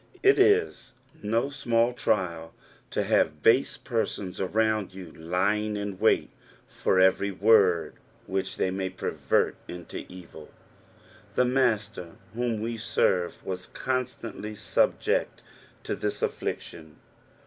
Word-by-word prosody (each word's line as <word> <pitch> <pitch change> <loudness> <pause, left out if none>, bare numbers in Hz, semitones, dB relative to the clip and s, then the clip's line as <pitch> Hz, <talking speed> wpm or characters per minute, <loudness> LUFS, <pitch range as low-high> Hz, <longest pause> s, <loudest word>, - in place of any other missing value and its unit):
It 400 +1 +5
is 415 +2 +3 0.3
no 115 +6 0
small 120 -3 +1
trial 85 -8 -1 0.3
to - - -1
have 75 -1 +1
base 120 +4 +4
persons 105 -6 -3
around 110 0 0
you 90 -4 -9
lying 100 +6 -1
in 100 -2 -5
wait - - +3 0.3
for 95 - 0
every 95 +2 +4
word 95 -5 +3 0.3
which 95 0 -3
they 95 - 0
may 95 0 -2
pervert 95 - 0
into 85 -1 -7
evil. 85 -4 -12 0.9
The 125 - +4
Master 110 -8 0 0.2
whom 120 -2 -1
we 115 +1 -3
serve 90 -5 0
was 90 -1 -5
constantly 125 -4 -4
subject 110 - 0 0.4
to - - -2
this - - -3
atniction. 80 -2 -4
100 Hz, 115 wpm, -27 LUFS, 90-115 Hz, 0.9 s, It